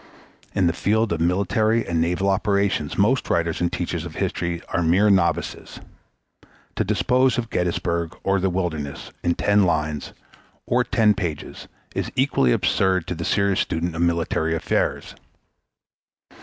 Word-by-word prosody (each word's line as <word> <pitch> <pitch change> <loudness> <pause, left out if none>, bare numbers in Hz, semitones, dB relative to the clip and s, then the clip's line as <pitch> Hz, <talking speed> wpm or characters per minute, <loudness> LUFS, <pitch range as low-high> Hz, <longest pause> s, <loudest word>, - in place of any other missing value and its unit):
In 95 - +2
the 85 - +2
field 110 +2 +1
of 80 - -3
military 100 +6 +1
and 85 -2 0
naval 90 +3 0
operations 100 -5 0
most 115 +6 +2
writers 85 0 0
and 85 - +1
teachers 85 -2 -3
of 85 -2 -8
history 85 -1 -2
are 85 - 0
mere 95 +6 +4
novices. 85 -3 0 1.0
To - - +2
dispose 125 +5 +2
of 115 -2 -3
Gettysburg 85 -1 -1
or 95 0 +2
the 95 +1 +1
Wilderness 80 -6 -4
in 85 0 +1
ten 100 0 +3
lines 75 -4 -1 0.5
or 125 +1 +2
ten 110 -3 +3
pages 85 -7 -5 0.3
is - - -3
equally 130 - +2
absurd 95 +5 +1
to - - -1
the 85 0 -5
serious 100 +1 +1
student 80 +1 -2
of 85 - -2
military 85 -1 0
affairs. 80 - -1
90 Hz, 145 wpm, -23 LUFS, 85-100 Hz, 1.0 s, mere